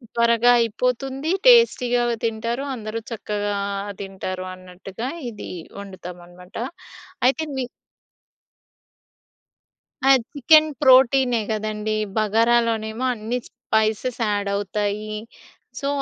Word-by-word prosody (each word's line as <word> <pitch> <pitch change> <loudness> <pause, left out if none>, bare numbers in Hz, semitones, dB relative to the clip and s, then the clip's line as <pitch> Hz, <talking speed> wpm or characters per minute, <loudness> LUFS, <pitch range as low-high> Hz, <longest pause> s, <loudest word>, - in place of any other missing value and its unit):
త్వరగా 235 +1 +4
అయిపోతుంది, 250 +5 -1 0.2
టేస్టీగానే 245 - +5
తింటారు. 230 +4 -2
అందరు 220 -1 -5
చక్కగా 205 -2 -3 0.5
తింటారు 190 -1 -5
అన్నట్టుగా 185 +5 -8 0.2
ఇది 215 - -9 0.3
వండుతామనమాట. 180 -2 -11 0.7
అయితే 295 +4 +1
మి 260 - -1 2.4
ఆ! 270 - +4 0.2
చికెన్ 310 +3 +5
ప్రోటీనే 260 -2 +5
గదండీ, 215 0 -2 0.2
బగరాలోనేమో 225 +1 +1
అన్ని 230 +2 -3
స్పైసెస్ 220 +3 -1
యాడ్ 205 -1 -1
అవుతాయి. 205 +1 -2 0.7
సో, 275 - -3
225 Hz, 80 wpm, -22 LUFS, 205-250 Hz, 2.4 s, టేస్టీగానే